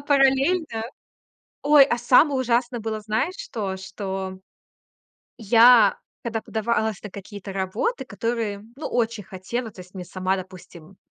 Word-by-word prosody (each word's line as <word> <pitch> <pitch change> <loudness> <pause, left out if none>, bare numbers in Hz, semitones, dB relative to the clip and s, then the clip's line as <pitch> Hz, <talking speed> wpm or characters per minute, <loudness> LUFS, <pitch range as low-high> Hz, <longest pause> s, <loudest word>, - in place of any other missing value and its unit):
параллельно 275 -1 +2 0.8
Ой, 290 -1 +7
а 240 -3 -1
самое 265 +4 +4
ужасное 240 0 0
было, 220 0 -3
знаешь, 220 - -1
что? 205 - -4
Что 190 0 -5 1.0
я, 230 +2 +6 0.3
когда 230 -1 -2
подавалась 220 -1 -1
на 210 - -7
какие-то 200 0 -9
работы, 195 - -2
которые, 225 -4 -3
ну 305 - -5
очень 230 -3 -1
хотела. 215 +5 -5
То 190 - -13
есть 180 +2 -20
мне 185 -2 -6
сама, 185 +1 -1
допустим 185 -1 -11
220 Hz, 130 wpm, -24 LUFS, 190-245 Hz, 1.0 s, Ой